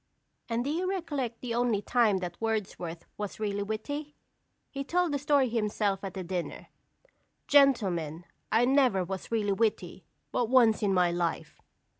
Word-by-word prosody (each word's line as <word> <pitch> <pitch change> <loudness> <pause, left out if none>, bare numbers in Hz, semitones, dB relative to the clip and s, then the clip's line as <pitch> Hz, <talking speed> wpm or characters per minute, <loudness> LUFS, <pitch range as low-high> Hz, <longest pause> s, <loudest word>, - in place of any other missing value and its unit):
And 230 +1 0
do 280 - -2
you 360 +4 -1
recollect 290 - -3
the 245 -2 -3
only 235 -3 +1
time 230 -5 +3
that 175 +1 -6
Wordsworth 190 -7 -3
was 205 0 -5
really 205 -1 -1
witty? 285 +9 -4 0.6
He 275 0 -4
told 350 +3 +1
the 285 - 0
story 285 -2 +3
himself 210 -3 -1
at 195 -1 -6
a 190 - -3
dinner. 180 -1 -5 0.8
"Gentlemen, 185 - +3 0.3
I 225 +3 +4
never 255 -8 +3
was 190 +4 -6
really 210 -3 +1
witty 195 -4 -1 0.3
but 240 -2 0
once 240 -4 +5
in 205 -2 +2
my 180 -2 +3
life." 170 -1 -3
220 Hz, 155 wpm, -29 LUFS, 190-265 Hz, 0.8 s, once